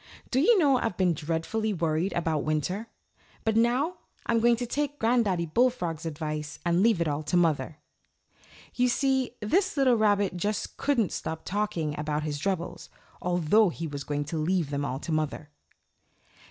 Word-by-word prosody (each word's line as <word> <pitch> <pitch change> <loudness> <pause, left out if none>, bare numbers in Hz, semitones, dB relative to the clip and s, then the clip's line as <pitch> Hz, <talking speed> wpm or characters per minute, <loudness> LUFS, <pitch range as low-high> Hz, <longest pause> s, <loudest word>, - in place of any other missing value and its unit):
Do 260 - +2
you 420 - +5
know, 280 -7 +4
I've 220 -5 -2
been 180 -2 +3
dreadfully 165 +8 -2
worried 165 +1 0
about 160 -3 0
winter; 180 +8 -1 0.6
but 220 -1 +1
now 250 +10 +2 0.3
I'm 230 -1 +2
going 235 +1 +4
to 245 +1 -3
take 290 +3 -2
Granddaddy 225 -8 +2
Bullfrog's 170 -5 0
advice 150 -1 -4
and 170 +1 +2
leave 215 -5 +3
it 170 - +1
all 145 0 -1
to 165 +4 0
mother." 160 -2 +1 1.0
You 250 0 +2
see, 265 -1 +1
this 365 - +1
little 265 -2 +4
rabbit 205 -3 +2
just 205 +4 -2
couldn't 240 - +1
stop 160 0 -5
talking 180 -7 -1
about 150 0 -1
his 150 -2 -3
troubles, 175 -1 -3 0.3
although 180 +4 +3
he 165 0 -5
was 145 -2 -5
going 145 0 -2
to 155 +2 -3
leave 165 -1 0
them 140 0 -1
all 130 -2 -2
to 155 - -6
mother! 155 -1 -2
180 Hz, 165 wpm, -27 LUFS, 155-230 Hz, 1.0 s, you